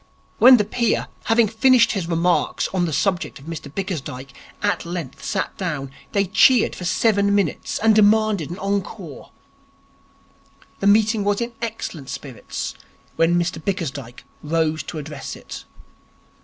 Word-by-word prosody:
When 255 Hz, +1 st, +9 dB
the 210 Hz, -, +1 dB
peer, 235 Hz, +2 st, 0 dB, 0.2 s
having 225 Hz, 0 st, +4 dB
finished 235 Hz, +3 st, +4 dB
his 190 Hz, -5 st, -2 dB
remarks 170 Hz, +1 st, +1 dB
on 185 Hz, -2 st, 0 dB
the 165 Hz, -, -2 dB
subject 175 Hz, +4 st, -1 dB
of 140 Hz, -, -14 dB
Mr 160 Hz, -3 st, -7 dB
Bickersdyke, 140 Hz, -8 st, -5 dB, 0.3 s
at 205 Hz, -, +1 dB
length 170 Hz, -6 st, -6 dB
sat 195 Hz, -3 st, -2 dB
down, 150 Hz, -8 st, -3 dB, 0.2 s
they 200 Hz, -1 st, +2 dB
cheered 220 Hz, +5 st, +4 dB
for 180 Hz, -, -7 dB
seven 200 Hz, +1 st, +2 dB
minutes, 195 Hz, -6 st, -1 dB
and 220 Hz, 0 st, +4 dB
demanded 215 Hz, -5 st, +3 dB
an 175 Hz, -, -6 dB
encore. 195 Hz, -5 st, -4 dB, 1.5 s
The 200 Hz, -, 0 dB
meeting 215 Hz, +1 st, +4 dB
was 205 Hz, 0 st, +1 dB
in 235 Hz, 0 st, -3 dB
excellent 215 Hz, -, -5 dB
spirits 130 Hz, -7 st, -6 dB, 0.4 s
when 165 Hz, +1 st, +3 dB
Mr 170 Hz, -2 st, -2 dB
Bickersdyke 145 Hz, -, -4 dB, 0.2 s
rose 160 Hz, 0 st, 0 dB
to 160 Hz, -, -7 dB
address 150 Hz, -2 st, -6 dB
it. -, -, -10 dB
185 Hz, 140 wpm, -22 LUFS, 160-210 Hz, 1.5 s, When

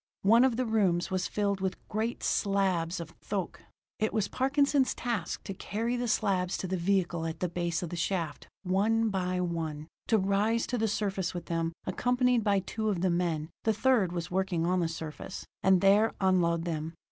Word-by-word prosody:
One 225 Hz, +5 st, +6 dB
of 260 Hz, -3 st, +3 dB
the 255 Hz, -, +1 dB
rooms 195 Hz, -7 st, +1 dB
was 185 Hz, -1 st, 0 dB
filled 200 Hz, -2 st, -1 dB
with 190 Hz, -1 st, -1 dB
great 220 Hz, +3 st, -2 dB
slabs 190 Hz, -4 st, +1 dB
of 165 Hz, -1 st, -7 dB
thoque; 195 Hz, -4 st, -4 dB, 0.4 s
it 215 Hz, -, +1 dB
was 215 Hz, -3 st, 0 dB
Parkinson's 275 Hz, 0 st, +2 dB
task 230 Hz, -9 st, -3 dB
to 195 Hz, -, -5 dB
carry 225 Hz, +5 st, -2 dB
the 245 Hz, 0 st, -1 dB
slabs 195 Hz, -4 st, +1 dB
to 185 Hz, -, -4 dB
the 190 Hz, -, -1 dB
vehicle 175 Hz, -2 st, 0 dB
at 160 Hz, 0 st, -5 dB
the 180 Hz, -, 0 dB
base 170 Hz, -1 st, -2 dB
of 170 Hz, -, -5 dB
the -, -, -3 dB
shaft, 170 Hz, -3 st, -2 dB, 0.2 s
one 215 Hz, +4 st, +2 dB
by 185 Hz, -2 st, -1 dB
one; 160 Hz, -4 st, -3 dB, 0.2 s
to 225 Hz, -, +4 dB
rise 205 Hz, +4 st, +1 dB
to 245 Hz, -, -2 dB
the 220 Hz, -, +2 dB
surface 195 Hz, -4 st, -1 dB
with 175 Hz, -1 st, -5 dB
them, 165 Hz, 0 st, -1 dB
accompanied 245 Hz, +4 st, +2 dB
by 200 Hz, -2 st, +2 dB
two 215 Hz, +3 st, -2 dB
of 185 Hz, -5 st, -1 dB
the 185 Hz, -1 st, +2 dB
men 170 Hz, -3 st, -1 dB
the 220 Hz, -, +2 dB
third 220 Hz, -5 st, +2 dB
was 175 Hz, -1 st, -4 dB
working 185 Hz, -3 st, 0 dB
on 180 Hz, +1 st, +2 dB
the 170 Hz, -, +1 dB
surface 160 Hz, +1 st, -7 dB, 0.2 s
and 190 Hz, -2 st, +4 dB
there 205 Hz, +3 st, +4 dB
unload 175 Hz, -3 st, +2 dB
them. 160 Hz, -1 st, -3 dB
190 Hz, 195 wpm, -30 LUFS, 170-220 Hz, 0.4 s, One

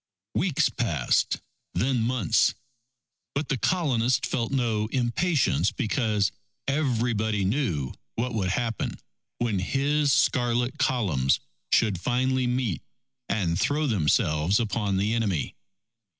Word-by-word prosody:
Weeks 175 Hz, -6 st, +2 dB
passed, 85 Hz, -, 0 dB, 0.3 s
then 125 Hz, -1 st, +1 dB
months. 115 Hz, -6 st, +2 dB, 0.8 s
But 145 Hz, +2 st, -2 dB
the 135 Hz, -, +1 dB
Colonists 130 Hz, -9 st, +1 dB
felt 115 Hz, -2 st, -2 dB
no 115 Hz, -5 st, 0 dB
impatience 140 Hz, +6 st, +1 dB
because 110 Hz, -5 st, 0 dB, 0.4 s
everybody 115 Hz, -7 st, 0 dB
knew 95 Hz, -, -1 dB, 0.2 s
what 120 Hz, +1 st, -2 dB
would 100 Hz, -4 st, 0 dB
happen 115 Hz, +3 st, -2 dB, 0.4 s
when 115 Hz, -5 st, 0 dB
his 140 Hz, +8 st, +1 dB
scarlet 125 Hz, -1 st, +1 dB
columns 85 Hz, -, +2 dB, 0.3 s
should 105 Hz, -6 st, +3 dB
finally 130 Hz, +2 st, +1 dB
meet 125 Hz, -, -1 dB, 0.5 s
and 90 Hz, -4 st, 0 dB
throw 150 Hz, +6 st, +1 dB
themselves 80 Hz, -, +2 dB
upon 105 Hz, -4 st, 0 dB
the 105 Hz, +3 st, +1 dB
enemy. 105 Hz, -9 st, -1 dB
115 Hz, 105 wpm, -26 LUFS, 100-130 Hz, 0.8 s, should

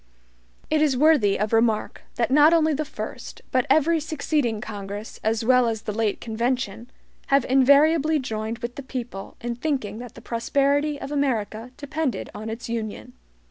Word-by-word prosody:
It 310 Hz, -1 st, +3 dB
is 285 Hz, -4 st, +2 dB
worthy 275 Hz, -9 st, +4 dB
of 210 Hz, +2 st, -1 dB
remark 225 Hz, -1 st, +1 dB
that 235 Hz, +1 st, 0 dB
not 300 Hz, +3 st, +6 dB
only 315 Hz, -1 st, +3 dB
the 300 Hz, +2 st, -1 dB
first, 305 Hz, -, -7 dB
but 255 Hz, -1 st, +1 dB
every 320 Hz, +2 st, +4 dB
succeeding 295 Hz, -7 st, -1 dB
Congress, 205 Hz, 0 st, -7 dB
as 220 Hz, +1 st, 0 dB
well 250 Hz, 0 st, +5 dB
as 220 Hz, -2 st, -2 dB
the -, -, -3 dB
late 215 Hz, -1 st, -1 dB
convention, 235 Hz, 0 st, -2 dB, 0.4 s
have 275 Hz, -2 st, +3 dB
invariably 285 Hz, +4 st, +4 dB
joined 220 Hz, -4 st, -3 dB
with 240 Hz, +1 st, -5 dB
the -, -, -4 dB
people 245 Hz, -7 st, -7 dB
in 235 Hz, 0 st, -3 dB
thinking 245 Hz, -7 st, -2 dB
that 245 Hz, -2 st, -9 dB
the -, -, -10 dB
prosperity 280 Hz, +5 st, 0 dB
of 275 Hz, -, -6 dB
America 240 Hz, -5 st, -1 dB
depended 290 Hz, -1 st, -3 dB
on 215 Hz, +2 st, -6 dB
its 225 Hz, +2 st, -6 dB
Union. 220 Hz, -, -5 dB
245 Hz, 165 wpm, -24 LUFS, 220-285 Hz, 0.4 s, not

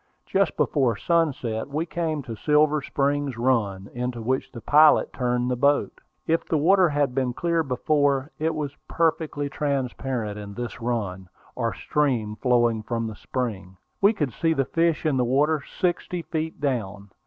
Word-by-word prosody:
Just 195 Hz, 0 st, +1 dB
before 130 Hz, -6 st, +2 dB
sunset 135 Hz, -10 st, 0 dB
we 150 Hz, +4 st, -2 dB
came 160 Hz, -4 st, -2 dB
to 115 Hz, -3 st, -6 dB
Silver 150 Hz, +5 st, +3 dB
Spring 140 Hz, 0 st, 0 dB
Run, 110 Hz, -6 st, 0 dB
into 125 Hz, 0 st, -3 dB
which 130 Hz, +4 st, -1 dB
the 120 Hz, -, -8 dB
pilot 150 Hz, +7 st, +5 dB
turned 125 Hz, -1 st, 0 dB
the -, -, +1 dB
boat. 140 Hz, +3 st, +1 dB, 0.2 s
If 165 Hz, +1 st, +1 dB
the 160 Hz, -, 0 dB
water 180 Hz, +4 st, +4 dB
had 145 Hz, -3 st, 0 dB
been 130 Hz, -2 st, 0 dB
clear 170 Hz, +4 st, 0 dB
before, 140 Hz, 0 st, +1 dB
it 160 Hz, +1 st, 0 dB
was 145 Hz, -2 st, -4 dB
perfectly 160 Hz, -3 st, 0 dB
transparent 130 Hz, -6 st, -2 dB
in 100 Hz, -1 st, -8 dB
this 120 Hz, -1 st, -6 dB
run, 100 Hz, -6 st, -3 dB, 0.3 s
or -, -, -1 dB
stream 125 Hz, -8 st, 0 dB
flowing 120 Hz, -3 st, +2 dB
from 115 Hz, +1 st, -3 dB
the 110 Hz, -1 st, -5 dB
spring. 100 Hz, -7 st, -4 dB, 0.2 s
We 200 Hz, +1 st, +6 dB
could 150 Hz, -, -2 dB
see 165 Hz, +6 st, +1 dB
the 135 Hz, -4 st, 0 dB
fish 165 Hz, +1 st, 0 dB
in 150 Hz, -4 st, +2 dB
the 125 Hz, -, +2 dB
water, 145 Hz, +5 st, +2 dB, 0.2 s
sixty 175 Hz, -1 st, -1 dB
feet 160 Hz, 0 st, -4 dB
down. 105 Hz, -8 st, -3 dB
135 Hz, 165 wpm, -25 LUFS, 120-155 Hz, 0.3 s, We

